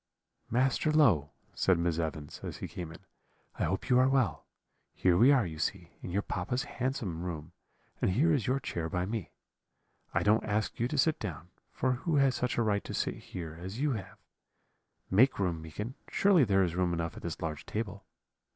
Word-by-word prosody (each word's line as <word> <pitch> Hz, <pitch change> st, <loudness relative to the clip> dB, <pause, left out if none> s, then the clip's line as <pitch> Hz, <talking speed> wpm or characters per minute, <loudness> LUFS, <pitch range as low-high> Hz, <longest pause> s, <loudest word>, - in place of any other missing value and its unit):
"'Master 130 Hz, +5 st, +2 dB
Low,' 110 Hz, -, +4 dB, 0.2 s
said 95 Hz, -2 st, +3 dB
Miss 85 Hz, -1 st, 0 dB
Evans, 80 Hz, -2 st, -4 dB
as -, -, -6 dB
he -, -, -5 dB
came 85 Hz, -3 st, -6 dB
in, 80 Hz, -, -13 dB, 0.5 s
'I -, -, +1 dB
hope -, -, -2 dB
you 125 Hz, 0 st, +5 dB
are 130 Hz, +1 st, +5 dB
well; 130 Hz, -9 st, +1 dB, 0.5 s
here 90 Hz, -2 st, +3 dB
we 120 Hz, +9 st, +7 dB
are, 130 Hz, -6 st, +4 dB
you 80 Hz, -2 st, -6 dB
see, 85 Hz, +1 st, -2 dB
in -, -, -6 dB
your 100 Hz, +3 st, 0 dB
papa's 120 Hz, +8 st, -2 dB
handsome 115 Hz, -10 st, -3 dB
room, 85 Hz, -2 st, -5 dB, 0.5 s
and -, -, +3 dB
here 150 Hz, -, +3 dB
is 135 Hz, -7 st, 0 dB
your 130 Hz, +2 st, +2 dB
chair 85 Hz, -10 st, -3 dB
by 90 Hz, +2 st, -1 dB
me. 105 Hz, -2 st, -3 dB, 0.8 s
I -, -, +1 dB
don't 110 Hz, +2 st, +4 dB
ask 105 Hz, 0 st, -1 dB
you 120 Hz, -, +2 dB
to 150 Hz, -, -3 dB
sit 155 Hz, +3 st, +3 dB
down, 90 Hz, -4 st, -6 dB, 0.2 s
for 130 Hz, -, 0 dB
who 150 Hz, +6 st, -1 dB
has 135 Hz, -2 st, +4 dB
such 125 Hz, 0 st, -1 dB
a 120 Hz, -, +3 dB
right 105 Hz, -2 st, +1 dB
to -, -, -4 dB
sit -, -, 0 dB
here 80 Hz, -3 st, -7 dB
as 95 Hz, +6 st, -6 dB
you 145 Hz, +1 st, +2 dB
have? 100 Hz, -6 st, -5 dB, 0.9 s
Make 125 Hz, +8 st, +5 dB
room, 90 Hz, -5 st, -1 dB
Meekin. 105 Hz, +10 st, -6 dB, 0.2 s
Surely 190 Hz, -8 st, +4 dB
there 95 Hz, -2 st, +3 dB
is 85 Hz, -3 st, 0 dB
room 90 Hz, -1 st, +1 dB
enough 85 Hz, -1 st, -2 dB
at -, -, -9 dB
this 85 Hz, -, -5 dB
large 80 Hz, -4 st, -4 dB
table? 105 Hz, -2 st, -4 dB
100 Hz, 200 wpm, -31 LUFS, 85-125 Hz, 0.9 s, we